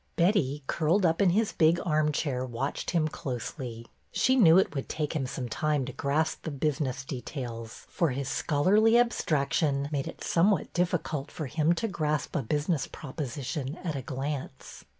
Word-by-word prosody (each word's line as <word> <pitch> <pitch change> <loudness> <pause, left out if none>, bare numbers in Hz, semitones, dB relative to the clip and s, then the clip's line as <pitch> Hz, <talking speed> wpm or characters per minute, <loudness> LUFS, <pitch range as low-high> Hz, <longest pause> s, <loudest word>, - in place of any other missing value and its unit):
Betty, 165 -6 +2
curled 170 +7 +2
up 165 +3 +2
in 195 - +5
his 215 +4 +2
big 165 +2 +3
armchair, 150 -4 +1
watched 130 +2 -3
him 165 -3 +2
closely. 125 -4 -5 0.3
She 235 +7 +3
knew 180 -9 +7
it 190 - +3
would 135 -2 -4
take 155 0 -2
him 135 -4 -1
some 125 -1 -4
time 150 +3 0
to 130 - -6
grasp 145 +5 0
the - - -4
business 140 -2 -1
details, 120 -3 -6
for 170 -4 0
his 135 0 -3
schol 145 +1 -1
arly 220 +4 +6
abstraction 145 -9 +1
made 140 -2 -1
it - - -8
somewhat 190 +4 +2
difficult 170 -5 -1
for 155 - -5
him 155 +5 +2
to 175 +7 -1
grasp 155 - -2
a 150 - +2
business 145 +5 0
proposition 140 +1 -5
at 165 -5 -2
a 135 - -3
glance. 135 +2 -5
150 Hz, 170 wpm, -28 LUFS, 135-170 Hz, 0.3 s, knew